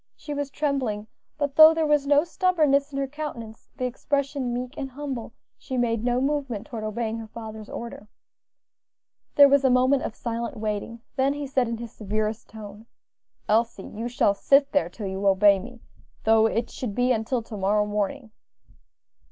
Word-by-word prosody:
She 295 - -7
was 285 -1 -3
trembling, 270 -8 -2 0.3
but 285 -1 -2
though 315 +1 +9
there 320 -1 +1
was 295 -2 +2
no 290 +1 +5
stubbornness 310 -6 +2
in 275 - -5
her 275 - 0
countenance, 265 -6 -7
the 255 - -2
expression 275 0 -2
meek 250 +3 -4
and 270 - -5
humble, 265 -4 -6 0.3
she 260 -2 -5
made 230 -2 0
no 245 0 +1
movement 270 -6 -2
toward 230 -6 -6
obeying 220 +1 -3
her 225 - -8
father's 220 -1 -9
order. 230 -3 -7 1.3
There 285 -1 +9
was 280 0 +4
a 265 - +4
moment 255 +2 +3
of - - -4
silent 235 +2 -4
waiting; 215 +2 -4 0.2
then 270 +1 +2
he 290 0 -4
said 260 -2 +1
in 230 0 -3
his 235 -1 -8
severest 215 +1 -3
tone, 215 0 -11 0.6
"Elsie, 220 -2 +1
you 225 +3 -6
shall 235 -4 +2
sit 275 +7 +3
there 285 - +1
till 215 - -8
you 190 +1 -2
obey 195 0 +5
me, 245 +3 -11 0.4
though 220 0 +5
it 230 +1 -2
should 220 -6 -5
be 250 +1 +2
until 230 +1 0
to 220 - -9
morrow 205 +1 +1
morning." 210 +4 -3
240 Hz, 175 wpm, -25 LUFS, 220-280 Hz, 1.3 s, though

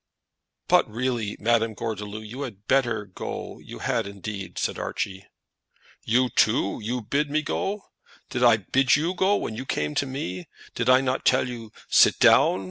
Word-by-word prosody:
"But - - +4
really, 115 -2 -2
Madame 115 0 +1
Gordeloup, 110 -1 -5
you 125 +6 -8
had 105 -7 -7
better 120 -6 +1
go; 95 - -7
you - - -10
had, - - -1
indeed," 100 -1 -7
said - - -2
Archie. 95 0 -4 0.8
"You, 125 +2 +2
too 110 -3 +2
you 120 +3 -3
bid 140 +7 0
me 155 +1 0
go? 200 +4 -2 0.5
Did 125 -1 -1
I 120 -2 +6
bid 130 +5 +2
you 165 +5 0
go 190 +2 +2
when 115 - -3
you 125 - -5
came 75 0 -1
to 140 - 0
me? 95 -10 -5 0.3
Did 115 +1 -1
I 130 +1 +6
not 130 0 -1
tell - - +3
you, 115 -3 -8 0.2
sit - - +5
down? - - +5
115 Hz, 170 wpm, -25 LUFS, 105-130 Hz, 0.8 s, I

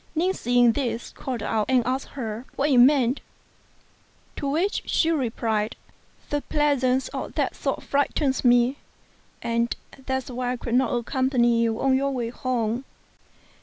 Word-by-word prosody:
Ning 360 +4 +2
seeing 245 -5 +3
this, 240 -2 -3
called 250 -5 -5
out 215 0 0
and 255 -3 +3
asked 260 +2 -1
her 225 -1 -4
what 285 +2 +1
it 255 - +5
meant; 260 0 +4 1.1
to 280 - -3
which 340 +8 0
she 325 - +2
replied 225 -6 -1 0.6
"The 290 0 0
presence 265 -4 +1
of - - -6
that - - 0
sword - - -2
frightens 280 -1 0
me, 245 +2 +4 0.7
and 235 0 0 0.3
that 265 0 0
is 255 - -10
why 250 0 -2
I - - -4
could 235 0 -5
not 260 +2 +3
accompany 240 -1 +2
you 225 -1 0
on 265 -1 +3
your 275 +1 +1
way 245 -4 -2
home." 240 -1 -2
255 Hz, 155 wpm, -25 LUFS, 235-275 Hz, 1.1 s, it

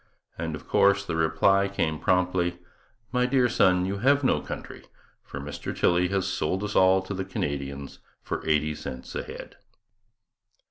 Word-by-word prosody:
and, 80 -1 -4
of 75 - -12
course, 100 0 +3
the 85 - -3
reply 80 +5 +3
came 80 -6 -1
promptly 90 -1 +1 0.5
'My 125 0 +2
dear 125 -1 +3
son, 90 -5 +3
you 100 +1 -3
have 140 +5 +3
no 130 - +2
country, - - -8 0.4
for 70 - -8
Mr 70 +1 -6
Tilley 90 +1 +3
has 95 0 -1
sold 95 +1 -1
us 105 0 -4
all 95 0 +5
to 95 - -5
the 95 0 -3
Canadians 70 -6 -4 0.2
for - - -4
eighty 75 0 +1
cents 65 -4 -8
a - - -2
head.' - - -10
90 Hz, 160 wpm, -26 LUFS, 80-100 Hz, 0.5 s, all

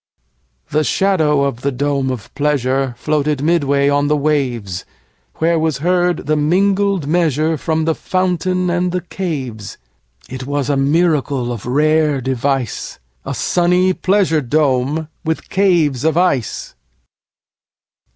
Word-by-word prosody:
The 155 +1 +2
shadow 155 -7 +2
of 135 -4 -2
the 140 - 0
dome 140 0 -1
of 125 -5 -6
pleasureFloated 140 +1 0
midway 140 -4 +2
on 145 0 +2
the 150 0 +2
waves; 125 -11 -1 0.5
Where 165 +1 +1
was 155 -4 0
heard 175 +1 0
the 155 +2 +1
mingled 190 +3 +1
measureFrom 160 0 0
the 160 - +2
fountain 185 0 -1
and 175 +1 0
the 180 0 -2
caves.It 120 - -7
was 145 0 -1
a - - +1
miracle 140 -3 +1
of 115 -2 -6
rare 150 +2 +2
device,A 125 - -3
sunny 180 +1 +2
pleasure 185 -5 +1
dome 145 +2 0 0.2
with 160 -1 -3
caves 170 -9 +2
of 160 0 +1
ice! 140 - 0
150 Hz, 115 wpm, -17 LUFS, 135-170 Hz, 0.5 s, The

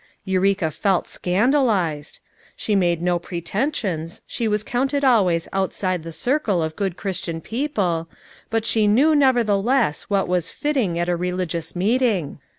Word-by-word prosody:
Eureka 190 -3 +1
felt 190 +3 0
scandalized. 190 - +1 0.4
She 210 - -1
made 175 -3 +1
no 175 -1 +1
pretensions, 175 - -3
she 230 - -2
was 210 0 0
counted 270 +5 -1
always 190 -10 +3
ouisidc 185 -2 -1
the 165 +1 -8
circle 220 - 0
of 160 0 -4
good 195 -4 -2
Christian 180 -4 -4
people, 195 - -2 0.4
but 225 -1 -1
she 220 -2 +2
knew 270 +10 +4
nevertheless 240 - +2
what 200 -1 +1
was 180 -1 0
fitting 260 - -1
at 175 0 0
a 175 - +1
religious 180 -2 -3
meeting! 205 - +1
195 Hz, 140 wpm, -22 LUFS, 170-230 Hz, 0.4 s, knew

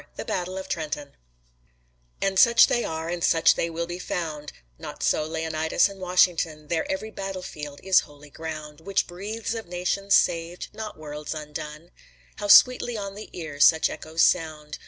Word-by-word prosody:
THE - - -6
BATTLE 185 +1 -3
OF 190 - -6
TRENTON 150 -3 -4 1.1
And 195 -1 +1
such 235 -1 +7
they 240 - 0
are 160 0 -4
and 170 0 -3
such 165 - +5
they 170 - -2
will 170 +1 -3
be 175 +1 -6
found: 155 -5 -4 0.3
Not - - -7
so 155 - +2
Leonidas 160 0 +1
and 195 -1 -12
Washington, 170 -4 +1
Their 165 -2 -1
every 215 +3 -4
battle 195 -2 -5
field 150 -4 -8
is 190 -1 +5
holy 145 -1 -12
ground 155 -1 -7
Which 195 +3 0
breathes 210 +6 -5
of 225 -4 -6
nations 180 +3 0
saved, 170 +1 0
not 215 0 -7
worlds 150 0 -6
undone. 150 +2 -7 0.5
How 205 - -4
sweetly 245 +2 +6
on 200 -1 -5
the 210 +2 -9
ear 155 -4 -7
such 160 +2 +5
echoes 160 +1 -1
sound! 155 -3 0
170 Hz, 170 wpm, -25 LUFS, 155-190 Hz, 1.1 s, such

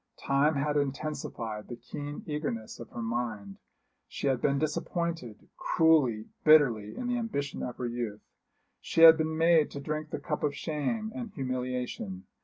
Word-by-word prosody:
Time 140 +3 +2
had 145 +1 0
intensified 135 -6 -3
the 120 - -6
keen 145 +5 -7
eagerness 150 -8 -4
of 115 - -9
her 120 - -6
mind. 115 -4 -3 0.5
She - - -6
had 135 -3 +1
been 140 -1 +2
disappointed, 155 - -3
cruelly, 140 -10 +3 0.2
bitterly, 125 -10 +5
in 250 - -4
the 245 0 0
ambition 145 - -3
of 125 - -5
her 125 - -3
youth. 120 -3 -4 0.6
She 165 - -1
had 165 0 +11
been 160 0 -1
made 165 -2 +4
to 140 - -7
drink 155 +2 -4
the - - -3
cup 150 -3 -3
of 145 -1 0
shame 175 - -2
and 240 -3 -5
humiliation. 125 -7 -3
140 Hz, 160 wpm, -29 LUFS, 120-155 Hz, 0.6 s, had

